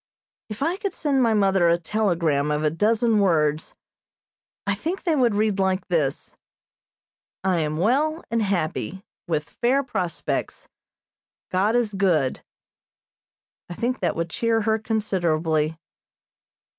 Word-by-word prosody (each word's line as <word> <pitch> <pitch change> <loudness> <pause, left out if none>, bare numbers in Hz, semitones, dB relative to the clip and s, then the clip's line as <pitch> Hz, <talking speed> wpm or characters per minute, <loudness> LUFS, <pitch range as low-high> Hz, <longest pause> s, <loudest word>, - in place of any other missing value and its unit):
If 215 +5 -4
I 335 +5 0
could 400 -2 -4
send 280 -4 +1
my 230 -3 +3
mother 195 -4 +3
a 170 - +4
telegram 170 -6 0
of 150 +1 0
a 150 - +2
dozen 220 +5 +2
words, 155 -5 +1 0.9
I 200 - +1
think 330 - -4
they 335 -4 +1
would 245 -6 +2
read 210 -1 +1
like 190 -1 0
this: 150 -6 -1 1.1
"I 185 -3 +2
am 155 -1 -1
well 290 - +1
and 230 0 +1
happy, 190 -1 -2 0.2
with 155 -3 -1
fair 255 - +1
prospects. 185 -10 -3 0.8
God 200 +5 +2
is 235 -4 +1
good." 175 -9 +1 1.3
I 175 - -6
think 250 +5 -1
that - - 0
would 165 0 -3
cheer 230 +2 +1
her 220 +1 +1
considerably. 165 -8 0
195 Hz, 130 wpm, -24 LUFS, 165-230 Hz, 1.3 s, a